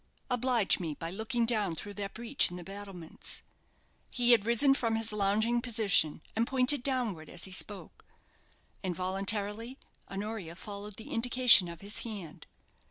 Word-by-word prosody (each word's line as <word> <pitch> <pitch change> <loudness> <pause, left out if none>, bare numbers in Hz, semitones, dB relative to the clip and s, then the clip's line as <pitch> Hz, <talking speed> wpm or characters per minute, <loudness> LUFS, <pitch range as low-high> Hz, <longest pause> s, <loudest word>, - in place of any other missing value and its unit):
"Oblige 245 -4 +2
me 160 -5 -4
by 165 +2 -6
looking 225 +4 -1
down 210 -7 +1
through 205 +5 -7
that 200 -1 -6
breach 235 +4 +1
in 175 - -9
the 180 - -8
battlements." 195 -3 -5 0.7
He 245 -1 +2
had 225 -3 +4
risen 235 +4 +5
from 230 -4 -1
his 225 -1 +1
lounging 215 +4 +1
position, 210 -11 +2
and 230 +2 0
pointed 260 +1 +2
downward 240 - -2
as 175 - -1
he 190 - +1
spoke. 195 +2 0 0.8
Involuntarily 200 +6 -2 0.3
Honoria 195 -4 -6
followed 205 +2 -8
the 220 - -11
indication 245 -4 +6
of 170 -1 -9
his 205 +2 -2
hand. 200 -9 -8
210 Hz, 150 wpm, -30 LUFS, 190-235 Hz, 0.8 s, indication